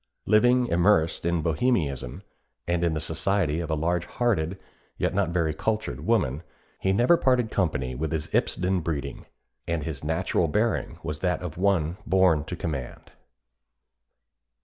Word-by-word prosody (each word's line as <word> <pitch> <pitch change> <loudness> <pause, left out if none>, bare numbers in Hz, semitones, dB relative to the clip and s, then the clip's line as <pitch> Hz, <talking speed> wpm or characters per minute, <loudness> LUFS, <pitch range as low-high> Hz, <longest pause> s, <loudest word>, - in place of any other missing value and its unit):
Living 120 +4 +4
immersed 85 -4 +2
in 85 -2 0
Bohemianism, 80 - -1 0.4
and 85 0 0
in 85 -2 +2
the 80 - -1
society 80 0 0
of 85 -2 -4
a 80 - +1
large 85 +2 -1
hearted, 95 -8 0 0.4
yet - - 0
not 95 -3 +1
very 85 -2 0
cultured 110 +7 -2
woman, 80 - +1 0.4
he 95 - +1
never 120 - +5
parted 125 -6 +2
company 70 -9 -1
with 80 +6 -3
his 80 -2 -2
Ipsden 90 +1 +1
breeding, 70 -4 -4 0.4
and 85 -2 -1
his 75 -1 -5
natural 80 +2 0
bearing 105 +6 0
was 75 -2 -4
that 90 0 -1
of 85 -4 -5
one 90 -3 +1
born 90 -5 +3
to 90 - -5
command." 75 -7 -5
85 Hz, 150 wpm, -26 LUFS, 80-100 Hz, 0.4 s, never